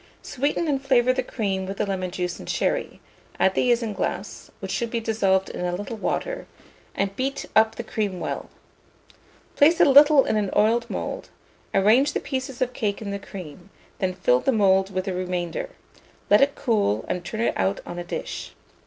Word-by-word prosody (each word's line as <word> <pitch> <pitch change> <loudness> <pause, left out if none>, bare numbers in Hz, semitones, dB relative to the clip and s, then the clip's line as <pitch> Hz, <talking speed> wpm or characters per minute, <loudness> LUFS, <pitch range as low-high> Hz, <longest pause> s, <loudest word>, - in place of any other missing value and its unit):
Sweeten 285 +5 -1
and 275 -3 0
flavour 255 -2 +3
the 260 - 0
cream 195 -6 -2
with 195 +1 -5
the - - 0
lemon 190 -2 -2
juice 180 -1 -3
and - - -9
sherry; - - -1 0.4
add 190 - +4
the 250 - +1
isinglass, 230 -3 -2
which - - -5
should 235 -2 -1
be 235 - -1
dissolved 195 -4 +1
in - - -5
a 175 0 -1
little 205 +5 -5
water, - - -3 0.5
and 195 0 -1
beat 270 +3 -2
up 220 0 +4
the 235 - -5
cream 205 -5 -2
well. - - -4 1.1
Place 325 +4 +5
a - - +7
little 285 0 +7
in 215 - +1
an 205 -2 0
oiled 225 +3 +3
mould; - - -4 0.4
arrange 230 +9 +4
the - - 0
pieces 260 -2 -3
of 250 0 -4
cake 205 -4 -2
in 205 -2 -5
the 200 - -3
cream; 185 -2 -10 0.3
then 185 -1 -1
fill 125 -9 +3
the 270 - +1
mould 195 -3 +3
with 185 0 -2
the 190 - -2
remainder; 180 - -3 0.6
let 205 - +7
it 280 0 +3
cool, 210 - 0
and 180 - -3
turn 215 +5 -4
it 235 - +1
out 95 +1 0
on 175 - -6
a - - -4
dish. 175 - -6
210 Hz, 190 wpm, -24 LUFS, 190-255 Hz, 1.1 s, a